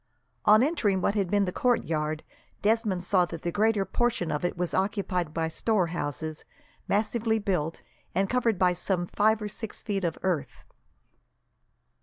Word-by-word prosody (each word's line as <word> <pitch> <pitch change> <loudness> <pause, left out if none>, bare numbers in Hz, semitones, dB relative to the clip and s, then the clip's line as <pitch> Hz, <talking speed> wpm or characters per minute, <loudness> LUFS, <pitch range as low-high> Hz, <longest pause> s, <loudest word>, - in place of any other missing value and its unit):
On 215 +3 +7
entering 225 - +1
what 195 - +1
had 200 -4 0
been 205 0 +3
the 180 - -2
courtyard, 155 -10 0 0.4
Desmond 210 -4 +1
saw 180 -1 +3
that 170 -2 -8
the 170 - -1
greater 210 0 +2
portion 190 -5 0
of 150 +2 -2
it 175 - -1
was 175 -1 -1
occupied 190 -4 0
by 165 0 -1
storehouses, 160 - -1 0.4
massively 220 +2 +1
built, 180 -6 -2 0.3
and 195 +1 +2
covered 235 -2 +1
by 180 -1 +3
some 180 0 -1
five 215 +4 +2
or - - -2
six 215 +1 -7
feet 200 -2 -2
of 170 -2 -1
earth. 180 -6 -2
190 Hz, 155 wpm, -28 LUFS, 170-215 Hz, 0.4 s, On